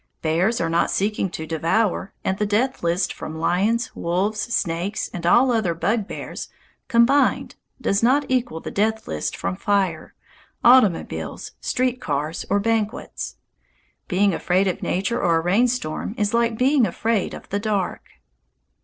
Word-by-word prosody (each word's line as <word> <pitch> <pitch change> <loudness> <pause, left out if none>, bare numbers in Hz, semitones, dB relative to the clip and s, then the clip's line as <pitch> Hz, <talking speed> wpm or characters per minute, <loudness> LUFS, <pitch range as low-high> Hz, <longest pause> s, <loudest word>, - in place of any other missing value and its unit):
Bears 175 +8 +1
are 165 - 0
not 165 +1 +1
seeking 200 -1 0
to 160 -2 -6
devour, 170 +6 0
and 190 +1 -1
the 210 - +1
death 245 +6 0
list 170 +2 0
from 155 - -7
lions, 205 +8 0
wolves, 190 +5 -1
snakes, 200 -4 -2
and 170 -3 -3
all 245 +7 +5
other 215 -8 +1
bugbears 210 +5 -3 0.4
combined 265 +3 +3 0.3
does 200 - +1
not 270 +5 +3
equal 250 -11 -1
the - - -7
death 220 +2 0
list 75 - -3
from 90 0 -2
fire, 190 - -1 0.5
automobiles, 235 -8 +3
street 250 0 0
cars, 150 - -3
or 200 - +3
banquets. 220 +1 -2 0.7
Being 195 0 +2
afraid 185 +3 +1
of 185 - -2
nature 195 +6 -1
or 170 -1 +3
a - - +1
rainstorm 205 0 0
is 210 0 0
like 235 -1 +1
being 260 -1 +3
afraid 225 -4 -1
of - - -11
the 200 - -1
dark. 205 -3 -1
205 Hz, 145 wpm, -22 LUFS, 175-230 Hz, 0.7 s, all